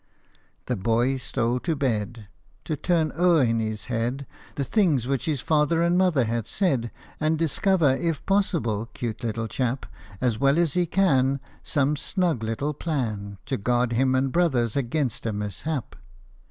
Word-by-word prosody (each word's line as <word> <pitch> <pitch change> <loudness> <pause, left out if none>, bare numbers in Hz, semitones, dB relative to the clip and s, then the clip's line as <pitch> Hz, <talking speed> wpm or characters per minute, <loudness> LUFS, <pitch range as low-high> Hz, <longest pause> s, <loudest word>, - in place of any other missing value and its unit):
The 125 - -1
boy 120 +6 +1
stole 120 -1 -1
to 165 +4 -1
bed, 115 -5 -2 0.4
To 155 - -1
turn 160 +1 +1
o'er 170 -3 +4
in 115 -1 +1
his 110 -2 -3
head 125 +3 -2 0.3
The 140 - -1
things 150 - +2
which 135 -2 -1
his 150 -5 -1
father 155 +2 +2
and 170 +1 +2
mother 180 -8 +3
had 115 -1 -2
said, 135 - 0 0.3
And 155 +1 +1
discover, 165 -2 +2
if 165 -3 -2
possible, 155 - 0
'cute 115 -2 -4
little 115 0 -2
chap! 125 +3 -2 0.3
As 120 -4 0
well 140 +2 +3
as 170 -4 +2
he 175 -1 +1
can, 140 -7 +2 0.2
Some 145 +1 +1
snug 170 - 0
little 115 +7 -2
plan 110 -11 -3
To 135 -1 -2
guard 120 +3 +1
him 130 +2 +2
and 130 0 +1
brothers 130 -10 +1
against 135 -2 -1
a 110 - -1
mishap. 105 - -4
135 Hz, 160 wpm, -25 LUFS, 115-160 Hz, 0.4 s, o'er